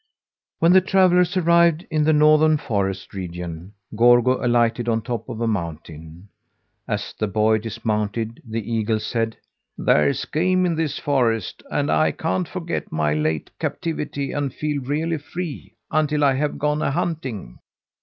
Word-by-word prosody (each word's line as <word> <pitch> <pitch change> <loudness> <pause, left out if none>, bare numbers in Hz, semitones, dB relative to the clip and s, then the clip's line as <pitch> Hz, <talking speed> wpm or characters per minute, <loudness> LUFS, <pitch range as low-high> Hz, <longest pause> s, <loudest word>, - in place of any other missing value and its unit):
When 170 +2 +4
the 190 - +7
travellers 185 -1 +3
arrived 170 -1 +3
in 155 -1 +1
the 155 - +4
northern 155 +1 +5
forest 95 -7 -3
region, 90 -1 -6 0.2
Gorgo 120 +3 +4
alighted 120 0 +2
on 115 -1 0
top 120 -3 -4
of 110 - -6
a 115 - 0
mountain. 80 -2 -5 0.6
As - - -3
the 110 - -2
boy 110 +2 +2
dismounted, 110 +1 -3
the 115 -1 -5
eagle 110 -1 0
said: 115 +1 -2 0.4
"There's 75 -2 +2
game 185 +3 +1
in 175 - +1
this 160 -3 -2
forest, 120 -7 0
and - - 0
I 80 0 +2
can't 95 -1 -2
forget - - -4
my 75 -1 0
late 75 0 -1
captivity 145 -4 -3
and 145 -2 -2
feel 150 0 -3
really 155 +5 -2
free 170 +1 -7 0.2
until 150 -1 +1
I 140 -1 +4
have 145 +3 -1
gone 150 +1 0
a - - +1
hunting. 130 - -4
120 Hz, 150 wpm, -22 LUFS, 105-155 Hz, 0.6 s, the